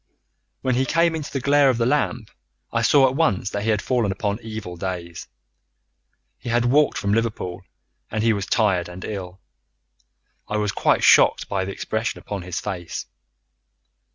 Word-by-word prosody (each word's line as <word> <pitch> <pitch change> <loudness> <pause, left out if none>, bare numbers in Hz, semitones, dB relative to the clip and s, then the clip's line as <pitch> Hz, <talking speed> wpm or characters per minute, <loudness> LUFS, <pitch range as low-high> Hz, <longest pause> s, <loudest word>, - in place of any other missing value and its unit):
"When 130 -1 +1
he 130 +2 +2
came 165 +1 +2
into 155 -3 -5
the 135 - -2
glare 140 +1 +4
of 125 - +1
the 115 - +1
lamp, 125 -4 0 0.4
I 115 - +1
saw 135 +3 +5
at 130 - -2
once 105 - +1
that 100 - -2
he 110 - -1
had 105 -2 +1
fallen 120 -6 +1
upon 100 +1 -2
very 115 -1 -11
evil 110 -5 -6
days. 85 -1 -5 1.1
He - - -7
had 120 +1 +2
walked 145 +5 +3
from 100 0 0
Liverpool, 105 -5 -2 0.5
and 110 0 -2
he 115 -1 +4
was 100 -1 -3
tired 95 -6 +1
and 90 +1 -8
ill. 95 -3 -6 1.1
I 105 - -2
was 105 -1 0
quite - - +1
shocked - - +5
by 95 -1 -1
the 100 - -4
expression 110 +4 -3
upon 100 -2 -6
his 90 0 -4
face. 90 -5 -5
110 Hz, 180 wpm, -23 LUFS, 95-125 Hz, 1.1 s, saw